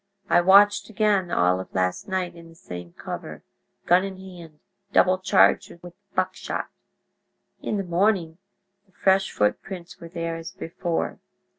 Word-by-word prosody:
I 175 Hz, -, +6 dB
watched 200 Hz, +4 st, +5 dB
again 205 Hz, -4 st, +1 dB
all 90 Hz, -, +2 dB
of 95 Hz, -, -9 dB
last 95 Hz, -, -1 dB
night 185 Hz, -2 st, -2 dB
in 170 Hz, -1 st, -13 dB
the 165 Hz, -, -17 dB
same 90 Hz, -, -9 dB
cover, -, -, -7 dB, 0.4 s
gun 180 Hz, +2 st, +5 dB
in 195 Hz, -1 st, -5 dB
hand, 175 Hz, -5 st, -12 dB, 0.3 s
double 185 Hz, 0 st, +4 dB
charged 185 Hz, 0 st, +4 dB
with 175 Hz, -1 st, -10 dB, 0.2 s
buckshot. -, -, -2 dB, 0.9 s
In 210 Hz, -, -2 dB
the 195 Hz, -, -1 dB
morning 175 Hz, -2 st, +1 dB, 0.5 s
the 190 Hz, -, -32 dB
fresh 190 Hz, +1 st, +2 dB
footprints 175 Hz, -, -2 dB
were 170 Hz, -, -10 dB
there, 165 Hz, -1 st, -4 dB
as 165 Hz, +2 st, -8 dB
before. 170 Hz, -2 st, -3 dB
175 Hz, 145 wpm, -24 LUFS, 165-190 Hz, 0.9 s, I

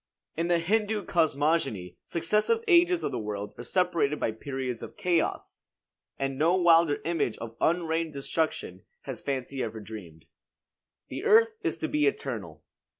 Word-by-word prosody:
In 165 Hz, +2 st, -1 dB
the 175 Hz, -1 st, +3 dB
Hindoo 210 Hz, +3 st, 0 dB
cosmogony 145 Hz, -, +1 dB
successive 210 Hz, -, +1 dB
ages 350 Hz, -1 st, +5 dB
of -, -, -1 dB
the -, -, -2 dB
world 105 Hz, -1 st, -4 dB
are -, -, -5 dB
separated 165 Hz, 0 st, +1 dB
by -, -, 0 dB
periods 130 Hz, +1 st, -4 dB
of -, -, -9 dB
chaos; 175 Hz, -3 st, 0 dB, 0.6 s
and 135 Hz, 0 st, -2 dB
no 165 Hz, +4 st, +4 dB
wilder 170 Hz, -4 st, +5 dB
image 160 Hz, -9 st, 0 dB
of 115 Hz, 0 st, -8 dB
unreined 165 Hz, -1 st, +1 dB
destruction 150 Hz, +3 st, -2 dB, 0.2 s
has -, -, -7 dB
fancy 135 Hz, -1 st, -3 dB
ever 110 Hz, -1 st, -4 dB
dreamed. 95 Hz, -7 st, -10 dB, 0.8 s
The -, -, -5 dB
earth 450 Hz, +1 st, +6 dB
is 345 Hz, -4 st, -1 dB
to 320 Hz, -, -2 dB
be 300 Hz, 0 st, +2 dB
eternal. 430 Hz, +2 st, -3 dB
160 Hz, 150 wpm, -28 LUFS, 130-185 Hz, 0.8 s, earth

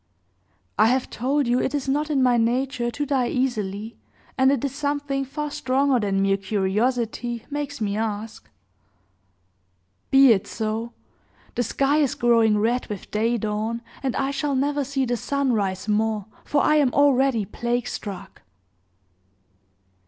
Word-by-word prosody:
"I -, -, +6 dB
have 255 Hz, +2 st, 0 dB
told 275 Hz, +5 st, 0 dB
you 245 Hz, +1 st, +2 dB
it 270 Hz, -, -1 dB
is 275 Hz, -2 st, -2 dB
not 295 Hz, +3 st, 0 dB
in 275 Hz, -3 st, +2 dB
my 250 Hz, -1 st, +4 dB
nature 240 Hz, +1 st, 0 dB
to 290 Hz, +5 st, -3 dB
die 265 Hz, -3 st, +1 dB
easily, 220 Hz, -4 st, -2 dB, 0.4 s
and 265 Hz, 0 st, +4 dB
it 280 Hz, -1 st, 0 dB
is 275 Hz, -, -3 dB
something 285 Hz, -1 st, -2 dB
far 295 Hz, +2 st, -4 dB
stronger 265 Hz, -1 st, +1 dB
than 195 Hz, -2 st, 0 dB
mere 195 Hz, 0 st, +2 dB
curiosity 225 Hz, +4 st, -1 dB
makes 290 Hz, -1 st, -4 dB
me 205 Hz, -2 st, -1 dB
ask." 220 Hz, 0 st, -4 dB, 1.6 s
"Be 270 Hz, -1 st, +7 dB
it 195 Hz, -1 st, -2 dB
so! 225 Hz, +1 st, -3 dB, 0.6 s
The -, -, -1 dB
sky 275 Hz, +5 st, +1 dB
is 290 Hz, -4 st, +1 dB
growing 230 Hz, -3 st, +3 dB
red 235 Hz, +4 st, 0 dB
with 205 Hz, -3 st, -7 dB
day 230 Hz, +3 st, +1 dB
dawn, 220 Hz, +2 st, -3 dB, 0.2 s
and 265 Hz, -2 st, -2 dB
I 270 Hz, 0 st, 0 dB
shall 280 Hz, 0 st, -1 dB
never 285 Hz, +2 st, 0 dB
see 270 Hz, 0 st, -1 dB
the 245 Hz, 0 st, -1 dB
sun 280 Hz, 0 st, 0 dB
rise 195 Hz, -2 st, -1 dB
more, 215 Hz, -1 st, 0 dB, 0.2 s
for 290 Hz, -, +1 dB
I 305 Hz, -, +4 dB
am 280 Hz, -4 st, +3 dB
already 270 Hz, -5 st, +3 dB
plague 240 Hz, +3 st, -2 dB
struck!" 195 Hz, -4 st, -7 dB
245 Hz, 150 wpm, -24 LUFS, 220-275 Hz, 1.6 s, Be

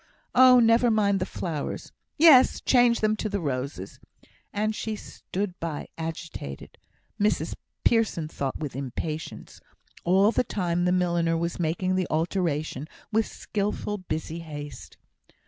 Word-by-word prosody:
"Oh! 255 Hz, 0 st, +8 dB
never 230 Hz, +1 st, +5 dB
mind 205 Hz, -3 st, +2 dB
the 185 Hz, -, -2 dB
flowers 160 Hz, -5 st, -4 dB, 0.3 s
yes! 290 Hz, -5 st, +7 dB
change 245 Hz, -2 st, +4 dB
them 215 Hz, 0 st, +2 dB
to 215 Hz, -, -2 dB
roses." 130 Hz, -, -4 dB, 0.5 s
And 215 Hz, +1 st, 0 dB
she 220 Hz, 0 st, -3 dB
stood 190 Hz, -2 st, -5 dB
by, 165 Hz, -3 st, -4 dB
agitated 160 Hz, -, -7 dB, 0.4 s
(Mrs 210 Hz, +1 st, +1 dB, 0.3 s
Pearson 220 Hz, -9 st, +2 dB
thought 140 Hz, -3 st, -3 dB
with 150 Hz, -5 st, -5 dB
impatience), 145 Hz, +4 st, -5 dB, 0.4 s
all 195 Hz, +4 st, +4 dB
the 235 Hz, -, +2 dB
time 175 Hz, -5 st, -1 dB
the 180 Hz, -, +3 dB
milliner 170 Hz, -2 st, +1 dB
was 170 Hz, +1 st, -2 dB
making 175 Hz, +3 st, 0 dB
the 185 Hz, -1 st, 0 dB
alteration 155 Hz, -4 st, -1 dB, 0.2 s
with 220 Hz, 0 st, +2 dB
skilful, 210 Hz, 0 st, -3 dB
busy 160 Hz, -2 st, -4 dB
haste. 145 Hz, -3 st, -8 dB
180 Hz, 130 wpm, -26 LUFS, 155-215 Hz, 0.5 s, Oh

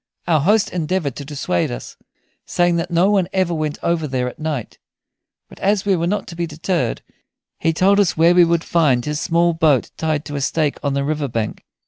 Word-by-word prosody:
Our 160 Hz, -3 st, +3 dB
host 205 Hz, +6 st, +2 dB
endeavored 165 Hz, -4 st, -1 dB
to 140 Hz, -, -6 dB
dissuade 135 Hz, -, -1 dB
us, -, -, -7 dB, 0.5 s
saying 175 Hz, -1 st, +2 dB
that 170 Hz, +1 st, -2 dB
no 175 Hz, +3 st, +3 dB
one 195 Hz, -4 st, +2 dB
ever 185 Hz, -2 st, +1 dB
went 155 Hz, -2 st, -2 dB
over 170 Hz, -2 st, 0 dB
there 130 Hz, -2 st, -1 dB
at 125 Hz, -, -8 dB
night; 155 Hz, -7 st, -4 dB, 0.7 s
but -, -, -16 dB
as 205 Hz, +1 st, +1 dB
we 195 Hz, -2 st, +3 dB
were 170 Hz, 0 st, -1 dB
not 200 Hz, +1 st, -1 dB
to 170 Hz, -, -8 dB
be 170 Hz, 0 st, -2 dB
deterred 160 Hz, -4 st, -2 dB, 0.6 s
he 165 Hz, -, +2 dB
told 195 Hz, +5 st, +3 dB
us 190 Hz, -6 st, +2 dB
where 165 Hz, +2 st, +5 dB
we 175 Hz, 0 st, +6 dB
would 170 Hz, 0 st, +1 dB
find 140 Hz, -8 st, +2 dB
his 150 Hz, 0 st, -2 dB
small 170 Hz, 0 st, +2 dB
boat 155 Hz, -6 st, +2 dB
tied 155 Hz, -2 st, -1 dB
to 145 Hz, -, -6 dB
a 140 Hz, -, -2 dB
stake 150 Hz, +1 st, 0 dB
on 140 Hz, -1 st, 0 dB
the 140 Hz, -, 0 dB
river 150 Hz, 0 st, -1 dB
bank. 115 Hz, -4 st, -4 dB
165 Hz, 210 wpm, -20 LUFS, 145-175 Hz, 0.7 s, we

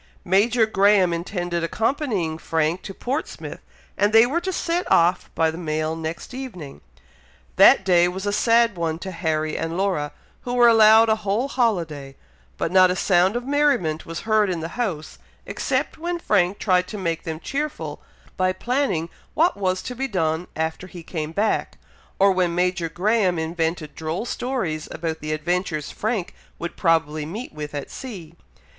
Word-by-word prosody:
Major 220 Hz, +5 st, +3 dB
Graham 200 Hz, -4 st, +3 dB
intended 175 Hz, 0 st, -3 dB
accompanying 210 Hz, -, -1 dB
Frank 160 Hz, +2 st, 0 dB
to -, -, -7 dB
Portsmouth, 270 Hz, +5 st, -4 dB, 0.4 s
and 205 Hz, +1 st, +2 dB
they 225 Hz, +1 st, +7 dB
were 305 Hz, +8 st, -1 dB
to 375 Hz, -, -2 dB
set 350 Hz, 0 st, -2 dB
off 175 Hz, +2 st, +3 dB
by 160 Hz, -1 st, +2 dB
the 160 Hz, -, -8 dB
mail 155 Hz, -1 st, -2 dB
next 165 Hz, +7 st, -6 dB
evening. 225 Hz, -, -8 dB, 0.8 s
That 190 Hz, -, +7 dB
day 175 Hz, -2 st, +5 dB
was 190 Hz, +2 st, -5 dB
a 205 Hz, -, 0 dB
sad 230 Hz, 0 st, +3 dB
one 165 Hz, -2 st, -2 dB
to 190 Hz, +2 st, -6 dB
Harry 155 Hz, -3 st, -1 dB
and 165 Hz, +1 st, -3 dB
Laura, 185 Hz, -7 st, 0 dB, 0.3 s
who 245 Hz, 0 st, -4 dB
were 240 Hz, -1 st, +6 dB
allowed 225 Hz, 0 st, +7 dB
a 220 Hz, -, +3 dB
whole 215 Hz, +5 st, -1 dB
holiday; 170 Hz, -, -1 dB, 0.4 s
but 165 Hz, -, -2 dB
not 185 Hz, 0 st, +6 dB
a 180 Hz, -, 0 dB
sound 185 Hz, +2 st, +3 dB
of 240 Hz, 0 st, -3 dB
merriment 270 Hz, -, +1 dB
was 165 Hz, 0 st, -5 dB
heard 215 Hz, -2 st, +2 dB
in 175 Hz, -2 st, -2 dB
the 165 Hz, +1 st, -5 dB
house, 185 Hz, -9 st, -4 dB, 0.3 s
except -, -, -2 dB
when 345 Hz, +1 st, -2 dB
Frank 200 Hz, -, +1 dB
tried 180 Hz, -2 st, +2 dB
to 210 Hz, -, -6 dB
make 170 Hz, -4 st, -2 dB
them 160 Hz, -2 st, -5 dB
cheerful, 295 Hz, -, -4 dB, 0.4 s
by 185 Hz, 0 st, +2 dB
planning 235 Hz, -, -1 dB, 0.3 s
what 335 Hz, +3 st, +3 dB
was 185 Hz, -2 st, -1 dB
to 250 Hz, -, -5 dB
be 270 Hz, +2 st, -2 dB
done 165 Hz, -5 st, -1 dB
after 160 Hz, +3 st, -3 dB
he 175 Hz, -2 st, -10 dB
came 160 Hz, -2 st, -4 dB
back, 205 Hz, +6 st, -1 dB, 0.4 s
or 195 Hz, 0 st, +5 dB
when 180 Hz, -2 st, +1 dB
Major 180 Hz, -1 st, 0 dB
Graham 190 Hz, +1 st, +1 dB
invented 160 Hz, -1 st, -2 dB
droll 160 Hz, +7 st, -4 dB
stories 235 Hz, -, -3 dB
about 160 Hz, -1 st, -4 dB
the 155 Hz, +1 st, -5 dB
adventures 155 Hz, -1 st, -2 dB
Frank 215 Hz, -4 st, -2 dB, 0.2 s
would 170 Hz, -, -5 dB
probably 160 Hz, -3 st, +1 dB
meet 205 Hz, -, -7 dB
with 150 Hz, -1 st, -6 dB
at 145 Hz, -, -5 dB
sea. 185 Hz, -11 st, -8 dB
180 Hz, 170 wpm, -23 LUFS, 165-220 Hz, 0.8 s, they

